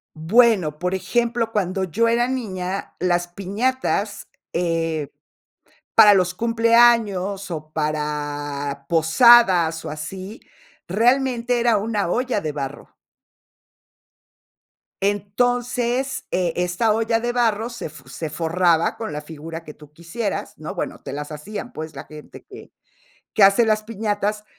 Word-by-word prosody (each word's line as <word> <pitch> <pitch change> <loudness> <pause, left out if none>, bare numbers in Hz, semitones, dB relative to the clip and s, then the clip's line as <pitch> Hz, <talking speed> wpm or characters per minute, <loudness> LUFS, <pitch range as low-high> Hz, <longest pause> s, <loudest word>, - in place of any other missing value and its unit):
Bueno, 180 -2 +3
por 180 +3 -2
ejemplo, 235 +3 -1
cuando 190 -2 0
yo 230 +7 +1
era 240 +1 +2
niña, 195 -7 -4
las 175 -1 0
piñatas, 205 +9 -2 0.2
eh, 165 -3 -1 0.9
para 210 -2 +9
los 180 -2 +2
cumpleaños, 230 -4 +3
o, 155 -2 -6
para 145 -2 -3
posadas, 170 -1 +5
o, - - -5
así, 185 +8 -7 0.5
realmente 245 +3 +1
era 235 -2 +3
una 210 -2 -1
olla 245 +2 0
de 155 -5 -3
barro. 145 0 -7 2.1
Entonces, 245 +5 -1
eh, 180 -2 0
esta 180 +5 +1
olla 225 +1 +1
de 240 +1 -1
barro 230 -1 0
se 235 - -6
f 150 -2 -14
se 155 +5 -6
forraba 165 +1 +1
con 220 -1 -5
la 150 - -5
figura 160 +2 -8
que 150 - -10
tú 150 -1 -17
quisieras, 170 +8 -4
¿no? - - -6
Bueno, - - -4
te - - -7
las 145 +2 -6
hacían, 205 +10 -7
pues, 155 0 -7
la - - -7
gente 150 -1 -12
que - - -13 0.6
que 205 - +5
hace 200 +4 +5
las 215 -1 +1
piñatas. 210 -1 -2
195 Hz, 130 wpm, -22 LUFS, 160-230 Hz, 2.1 s, para